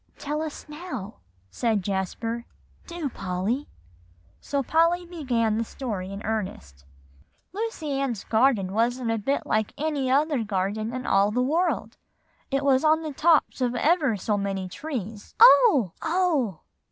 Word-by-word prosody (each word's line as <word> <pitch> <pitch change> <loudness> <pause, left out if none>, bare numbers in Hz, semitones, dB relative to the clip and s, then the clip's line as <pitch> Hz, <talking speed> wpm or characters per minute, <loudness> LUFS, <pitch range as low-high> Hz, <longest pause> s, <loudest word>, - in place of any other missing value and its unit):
"Tell 300 +1 -3
us 315 0 -6
now," 295 - -7 0.3
said 220 -5 0
Jasper; 215 +5 -3 0.4
"do, 340 -4 -4
Polly." 195 +5 -3 0.7
So 280 -1 -2
Polly 335 +5 +2
began 245 -10 -1
the - - +1
story 210 -6 -5
in 200 +2 -7
earnest. 130 - -4 0.7
"Lucy 365 -10 -3
Ann's 245 -7 -2
Garden 220 -5 +2
wasn't 235 +2 0
a 225 - 0
bit 275 +7 -1
like 215 -1 0
any 290 -3 -1
other 285 -1 +2
garden 205 +2 -2
in 255 +1 -5
all 195 +1 +3
the 250 +4 0
world; 335 +7 0 0.5
it 275 0 -1
was 265 0 +4
up 310 0 +6
on 320 +1 -2
the 305 -2 -4
tops 310 -2 +2
of 250 -1 0
ever 290 - +2
so 205 +2 -1
many 195 -1 -2
trees" 225 - -6
"Oh, 435 - +7
oh!" 320 - 0
250 Hz, 145 wpm, -25 LUFS, 210-300 Hz, 0.7 s, Oh